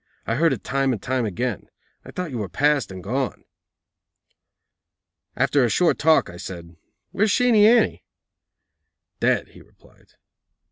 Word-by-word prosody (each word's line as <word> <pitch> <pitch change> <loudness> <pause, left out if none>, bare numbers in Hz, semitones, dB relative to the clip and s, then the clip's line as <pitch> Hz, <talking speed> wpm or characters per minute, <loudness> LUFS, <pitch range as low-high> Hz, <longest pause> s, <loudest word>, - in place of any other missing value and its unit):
I 115 - -1
heard 160 +6 +2
it 130 - -4
time 135 -1 0
and 110 - -4
time 130 +1 -2
again. 120 +6 -4 0.3
I - - -13
thought 180 -4 -5
you 120 - -4
were 100 -3 -4
past 145 - +1
and 95 -1 -9
gone." 130 +6 -3 1.9
After 140 -2 +2
a 120 - +2
short 175 +9 +2
talk, 160 0 +3
I 85 - -10
said: 85 -2 -9 0.4
"Where's 215 +2 +1
Sheenie 225 -2 +4
Annie?" 235 +1 +3 1.2
"Dead," - - +1
he - - -16
replied. - - -24
130 Hz, 145 wpm, -22 LUFS, 105-160 Hz, 1.9 s, Sheenie